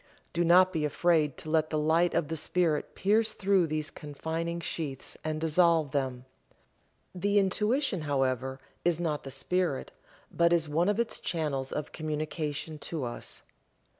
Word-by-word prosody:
Do 170 Hz, 0 st, +2 dB
not 185 Hz, +2 st, +6 dB
be 160 Hz, -3 st, 0 dB
afraid 150 Hz, -1 st, +2 dB
to 155 Hz, -, -8 dB
let 155 Hz, -1 st, +2 dB
the 155 Hz, -, -1 dB
light 160 Hz, +3 st, +2 dB
of 150 Hz, -, +1 dB
the 160 Hz, -, -3 dB
Spirit 160 Hz, -1 st, 0 dB
pierce 215 Hz, +3 st, +2 dB
through 195 Hz, -3 st, +2 dB
these 155 Hz, 0 st, -3 dB
confining 160 Hz, +3 st, -4 dB
sheaths 150 Hz, -5 st, -5 dB
and 155 Hz, 0 st, -2 dB
dissolve 160 Hz, -2 st, +3 dB
them. 130 Hz, -3 st, -2 dB, 0.9 s
The 200 Hz, +3 st, +1 dB
Intuition, 210 Hz, -, +1 dB
however, 130 Hz, -2 st, 0 dB, 0.2 s
is 175 Hz, -1 st, +2 dB
not 155 Hz, -4 st, -1 dB
the 135 Hz, -, -8 dB
Spirit, 140 Hz, -, -1 dB, 0.4 s
but 170 Hz, 0 st, +3 dB
is 165 Hz, -2 st, +2 dB
one 165 Hz, +6 st, +2 dB
of 210 Hz, +2 st, +1 dB
its 235 Hz, -, -1 dB
channels 145 Hz, -5 st, -2 dB
of 150 Hz, -1 st, -4 dB
communication 155 Hz, 0 st, -3 dB
to 155 Hz, -1 st, -4 dB
us. 120 Hz, -1 st, -6 dB
160 Hz, 155 wpm, -29 LUFS, 150-175 Hz, 0.9 s, not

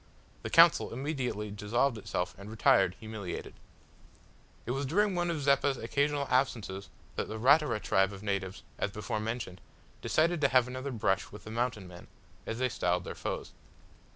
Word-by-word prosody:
The -, -, -4 dB
council -, -, +6 dB
immediately 125 Hz, -6 st, -3 dB
dissolved 115 Hz, +6 st, 0 dB
itself 90 Hz, -4 st, -3 dB
and 100 Hz, +1 st, -9 dB
retired 105 Hz, -4 st, +3 dB
humiliated. 110 Hz, -5 st, -6 dB, 1.1 s
It 120 Hz, -, -2 dB
was 135 Hz, +2 st, -1 dB
during 205 Hz, +7 st, +2 dB
one 175 Hz, -1 st, 0 dB
of 155 Hz, -4 st, -2 dB
Zeppa's 140 Hz, -1 st, +3 dB
occasional 140 Hz, +4 st, 0 dB
absences 110 Hz, -7 st, 0 dB, 0.3 s
that -, -, -1 dB
the 110 Hz, -, -5 dB
Ratura 140 Hz, +1 st, +4 dB
tribe 95 Hz, -1 st, +2 dB
of 100 Hz, 0 st, -9 dB
natives, 95 Hz, -2 st, -3 dB, 0.2 s
as -, -, 0 dB
before 105 Hz, +2 st, -3 dB
mentioned, 110 Hz, -5 st, -4 dB, 0.4 s
decided 165 Hz, +1 st, +2 dB
to 140 Hz, -, +5 dB
have 130 Hz, -2 st, +4 dB
another 130 Hz, +2 st, -5 dB
brush 95 Hz, -5 st, 0 dB
with 105 Hz, -, -11 dB
the 110 Hz, -, -8 dB
Mountain 115 Hz, -4 st, -2 dB
men, 90 Hz, -1 st, -12 dB, 0.4 s
as 110 Hz, -, -3 dB
they 130 Hz, +1 st, +1 dB
styled 90 Hz, -5 st, 0 dB
their -, -, -6 dB
foes. -, -, -4 dB
115 Hz, 165 wpm, -31 LUFS, 100-140 Hz, 1.1 s, council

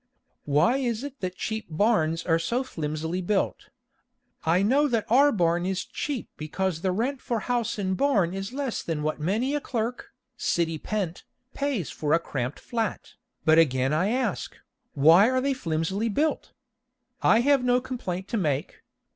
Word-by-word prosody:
Why 150 Hz, -, +3 dB
is 240 Hz, -3 st, -1 dB
it 280 Hz, -1 st, -7 dB
that 185 Hz, -1 st, -4 dB
cheap 220 Hz, +2 st, -4 dB
barns 165 Hz, -3 st, +1 dB
are 165 Hz, -1 st, +3 dB
so 235 Hz, +10 st, -1 dB
flimsily 160 Hz, -, -3 dB
built? 195 Hz, +2 st, -1 dB, 0.7 s
I 170 Hz, +4 st, +3 dB
know 275 Hz, +8 st, +3 dB
that 230 Hz, -5 st, 0 dB
our 280 Hz, +4 st, +6 dB
barn 175 Hz, -5 st, +1 dB
is 190 Hz, -1 st, -2 dB
cheap 280 Hz, -6 st, -4 dB
because 160 Hz, +2 st, -2 dB
the 185 Hz, -, +1 dB
rent 255 Hz, +8 st, -1 dB
for 230 Hz, -3 st, -2 dB
house 235 Hz, -2 st, -1 dB
and 190 Hz, -2 st, -1 dB
barn 200 Hz, -9 st, +2 dB
is 195 Hz, +2 st, -4 dB
less 270 Hz, -3 st, -3 dB
than 155 Hz, -3 st, -3 dB
what 155 Hz, +1 st, -1 dB
many 215 Hz, -, 0 dB
a 295 Hz, -, 0 dB
clerk, 235 Hz, -1 st, -3 dB, 0.3 s
city 165 Hz, -9 st, 0 dB
pent, 190 Hz, -4 st, -3 dB, 0.3 s
pays 280 Hz, -, -2 dB
for 150 Hz, -1 st, -1 dB
a 165 Hz, -, +5 dB
cramped 135 Hz, -4 st, -4 dB
flat, 225 Hz, -4 st, -3 dB, 0.3 s
but 155 Hz, +1 st, +6 dB
again 135 Hz, -3 st, +2 dB
I 170 Hz, +5 st, +2 dB
ask, 255 Hz, +3 st, -1 dB, 0.4 s
why 165 Hz, -, +6 dB
are 260 Hz, 0 st, +2 dB
they 275 Hz, +1 st, +1 dB
flimsily 190 Hz, 0 st, -1 dB
built? 300 Hz, +9 st, -1 dB, 0.7 s
I 225 Hz, -, +5 dB
have 275 Hz, 0 st, +3 dB
no 250 Hz, 0 st, +3 dB
complaint 215 Hz, -8 st, -5 dB
to 230 Hz, -, -1 dB
make. 150 Hz, -7 st, -2 dB
195 Hz, 165 wpm, -26 LUFS, 165-245 Hz, 0.7 s, our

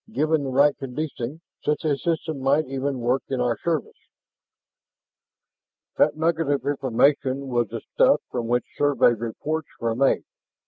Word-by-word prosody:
Given 155 Hz, -5 st, +1 dB
the 135 Hz, -, -3 dB
right 140 Hz, +2 st, +4 dB
conditioning, 135 Hz, +1 st, -5 dB, 0.2 s
such 150 Hz, +2 st, -1 dB
a 150 Hz, -2 st, +2 dB
system 160 Hz, 0 st, -2 dB
might 140 Hz, +4 st, +2 dB
even 135 Hz, 0 st, -3 dB
work 125 Hz, +3 st, +1 dB
in 130 Hz, -, -1 dB
our 120 Hz, -1 st, +1 dB
service." 165 Hz, -4 st, -2 dB, 2.0 s
That -, -, +3 dB
nugget 160 Hz, -1 st, +1 dB
of 140 Hz, -1 st, 0 dB
information 135 Hz, 0 st, +1 dB
was 120 Hz, -2 st, +1 dB
the -, -, -6 dB
stuff -, -, +5 dB
from 120 Hz, -2 st, -3 dB
which 120 Hz, +1 st, +1 dB
Survey 145 Hz, -4 st, +4 dB
reports 130 Hz, +7 st, -4 dB
were 115 Hz, -1 st, 0 dB
made. 135 Hz, +2 st, +2 dB
140 Hz, 145 wpm, -24 LUFS, 125-150 Hz, 2.0 s, stuff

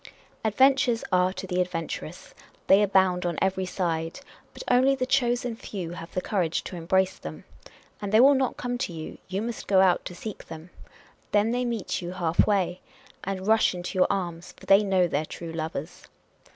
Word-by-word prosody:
Adventures 255 Hz, +2 st, +3 dB
are 180 Hz, 0 st, +3 dB
to 185 Hz, 0 st, -6 dB
the 180 Hz, -1 st, 0 dB
adventurous. 170 Hz, -1 st, -5 dB, 0.3 s
They 195 Hz, +2 st, +6 dB
abound 190 Hz, -2 st, +3 dB
on 175 Hz, -2 st, -2 dB
every 190 Hz, -1 st, 0 dB
side; 165 Hz, +3 st, -2 dB, 0.3 s
but -, -, -9 dB
only 260 Hz, +2 st, +4 dB
the 255 Hz, -1 st, -1 dB
chosen 245 Hz, -3 st, +1 dB
few 190 Hz, -6 st, -6 dB
have 170 Hz, -1 st, -8 dB
the 185 Hz, -, 0 dB
courage 180 Hz, -6 st, -1 dB
to -, -, -7 dB
embrace 190 Hz, +2 st, +1 dB
them. 80 Hz, 0 st, -8 dB, 0.6 s
And 200 Hz, -1 st, -4 dB
they 215 Hz, -, +5 dB
will 275 Hz, +4 st, +8 dB
not 265 Hz, -2 st, 0 dB
come 245 Hz, 0 st, -3 dB
to -, -, -2 dB
you: 160 Hz, -1 st, -8 dB
you 190 Hz, +2 st, -2 dB
nuist 235 Hz, -1 st, -5 dB
go 195 Hz, -2 st, +4 dB
out 185 Hz, -2 st, +4 dB
to 180 Hz, -, -7 dB
seek 215 Hz, +3 st, -7 dB
them. 160 Hz, +2 st, -10 dB, 0.6 s
Then 210 Hz, +2 st, +3 dB
they 245 Hz, +1 st, 0 dB
meet 230 Hz, -6 st, -2 dB
you 175 Hz, 0 st, -5 dB
halfway, 180 Hz, +1 st, +1 dB, 0.4 s
and 190 Hz, 0 st, -4 dB
rush 220 Hz, -3 st, +3 dB
into 175 Hz, +2 st, -6 dB
your -, -, +5 dB
arms, 175 Hz, -4 st, -3 dB
for -, -, -14 dB
they 195 Hz, +2 st, +6 dB
know 190 Hz, -3 st, +3 dB
their 150 Hz, -2 st, -1 dB
true 165 Hz, +1 st, -8 dB
lovers. 160 Hz, 0 st, -5 dB
190 Hz, 185 wpm, -26 LUFS, 175-220 Hz, 0.6 s, will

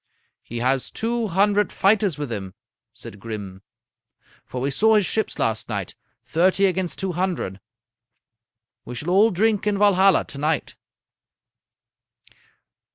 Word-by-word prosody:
"'He 120 Hz, -, -8 dB
has 130 Hz, +1 st, 0 dB
two 230 Hz, 0 st, -2 dB
hundred 205 Hz, +3 st, +2 dB
fighters 200 Hz, -5 st, +2 dB
with 145 Hz, -4 st, -5 dB
him,' 95 Hz, -4 st, -5 dB, 0.4 s
said 100 Hz, -, -11 dB
Grim; 100 Hz, -3 st, -7 dB, 0.9 s
'for 125 Hz, -, -5 dB
we 135 Hz, +3 st, -1 dB
saw 220 Hz, +9 st, +3 dB
his 210 Hz, -2 st, +3 dB
ships 220 Hz, +3 st, -1 dB
last 115 Hz, -7 st, -1 dB
night. 100 Hz, -4 st, -3 dB, 0.3 s
Thirty 185 Hz, +4 st, +2 dB
against 185 Hz, -2 st, -1 dB
two 190 Hz, -1 st, -2 dB
hundred! 175 Hz, -, -2 dB, 1.2 s
We 125 Hz, -, -8 dB
shall 150 Hz, +8 st, -4 dB
all 205 Hz, +4 st, +5 dB
drink 210 Hz, +1 st, +1 dB
in 205 Hz, -1 st, +1 dB
Valhalla 195 Hz, -2 st, +4 dB
to 140 Hz, -, -9 dB
night.' 155 Hz, +2 st, -1 dB
180 Hz, 130 wpm, -23 LUFS, 125-205 Hz, 1.2 s, all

